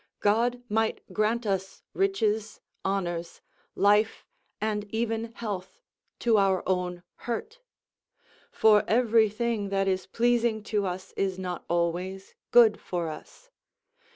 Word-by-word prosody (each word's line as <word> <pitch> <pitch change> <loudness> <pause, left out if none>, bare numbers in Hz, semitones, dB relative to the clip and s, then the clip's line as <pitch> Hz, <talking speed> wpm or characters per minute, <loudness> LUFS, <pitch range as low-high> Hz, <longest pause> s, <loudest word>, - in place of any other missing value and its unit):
God 240 +4 +2
might 220 +1 0
grant 220 +2 +1
us 190 -1 -2
riches, 220 - 0 0.2
honours, 175 -3 -2 0.4
life, 210 +2 +3 0.3
and 210 -1 -1
even 225 0 -1
health, 190 -5 -6 0.4
to 230 -3 +4
our 195 -1 +2
own 180 -1 -1 0.2
hurt; 440 - -4 0.9
for 210 -1 +5
every 225 -1 +4
thing 215 -1 -2
that 195 0 0
is 190 -1 0
pleasing 235 -2 +1
to 210 -2 -1
us 185 +1 -6
is 190 -1 -1
not 180 -2 -5
always 175 +3 -2 0.2
good 230 -3 +6
for 175 -3 -3
us. - - -11
210 Hz, 120 wpm, -27 LUFS, 190-225 Hz, 0.9 s, good